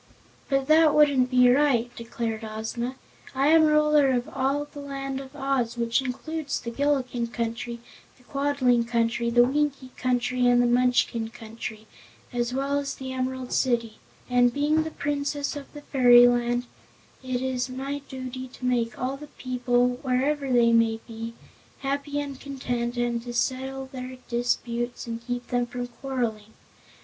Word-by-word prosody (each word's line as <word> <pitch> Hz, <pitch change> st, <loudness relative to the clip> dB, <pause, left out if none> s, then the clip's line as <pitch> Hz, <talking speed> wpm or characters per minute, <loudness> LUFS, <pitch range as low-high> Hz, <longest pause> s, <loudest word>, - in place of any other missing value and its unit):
"But 275 Hz, -1 st, +1 dB
that 310 Hz, +1 st, +5 dB
wouldn't 285 Hz, -4 st, +4 dB
be 250 Hz, -1 st, +5 dB
right," 245 Hz, -3 st, +2 dB
declared 230 Hz, -1 st, -4 dB
Ozma. 225 Hz, +3 st, -4 dB, 0.4 s
"I 275 Hz, +2 st, +3 dB
am 320 Hz, 0 st, +6 dB
Ruler 300 Hz, -2 st, +4 dB
of 245 Hz, +2 st, -1 dB
all 280 Hz, -1 st, 0 dB
the 290 Hz, 0 st, -11 dB
Land 275 Hz, -1 st, -4 dB
of 270 Hz, +1 st, -12 dB
Oz, 270 Hz, -4 st, -1 dB
which 235 Hz, +2 st, +1 dB
includes 280 Hz, +3 st, -3 dB
the 235 Hz, -, -6 dB
Gillikin 255 Hz, -3 st, 0 dB
Country, 235 Hz, 0 st, -4 dB, 0.4 s
the 250 Hz, -, -23 dB
Quadling 270 Hz, -3 st, +1 dB
Country, 235 Hz, 0 st, +1 dB
the 240 Hz, +1 st, +5 dB
Winkie 275 Hz, 0 st, 0 dB
Country 250 Hz, 0 st, +1 dB
and 245 Hz, 0 st, +5 dB
the 245 Hz, -, +4 dB
Munchkin 245 Hz, -2 st, +2 dB
Country, 220 Hz, -1 st, -8 dB, 0.5 s
as 240 Hz, 0 st, -1 dB
well 275 Hz, +2 st, 0 dB
as 280 Hz, -1 st, -4 dB
the 260 Hz, -1 st, -6 dB
Emerald 260 Hz, 0 st, -3 dB
City, 235 Hz, -4 st, 0 dB, 0.3 s
and 245 Hz, -1 st, +4 dB
being 295 Hz, +4 st, +2 dB
the 315 Hz, -, -3 dB
Princess 285 Hz, -1 st, -2 dB
of 285 Hz, -1 st, -8 dB
this 295 Hz, -1 st, -10 dB
fairyland 245 Hz, -1 st, +5 dB, 0.6 s
it 255 Hz, -1 st, -2 dB
is 255 Hz, -1 st, -1 dB
my 270 Hz, +3 st, -4 dB
duty 255 Hz, 0 st, -6 dB
to 255 Hz, 0 st, -9 dB
make 240 Hz, -2 st, 0 dB
all 260 Hz, +2 st, -2 dB
my 300 Hz, -, -8 dB
people 245 Hz, -1 st, +1 dB
wherever 275 Hz, +1 st, 0 dB
they 235 Hz, -1 st, +5 dB
may 225 Hz, -1 st, +3 dB
be 230 Hz, 0 st, -7 dB, 0.5 s
happy 285 Hz, +1 st, -2 dB
and 280 Hz, -2 st, -5 dB
content 245 Hz, -3 st, -3 dB
and 240 Hz, -1 st, 0 dB
to 240 Hz, 0 st, -7 dB
settle 265 Hz, +2 st, -1 dB
their 255 Hz, -1 st, -8 dB
disputes 240 Hz, 0 st, -1 dB
and 230 Hz, 0 st, -5 dB
keep 245 Hz, 0 st, -3 dB
them 245 Hz, -1 st, 0 dB
from 245 Hz, 0 st, -4 dB
quarreling. 240 Hz, -4 st, -4 dB
250 Hz, 155 wpm, -26 LUFS, 240-275 Hz, 0.6 s, am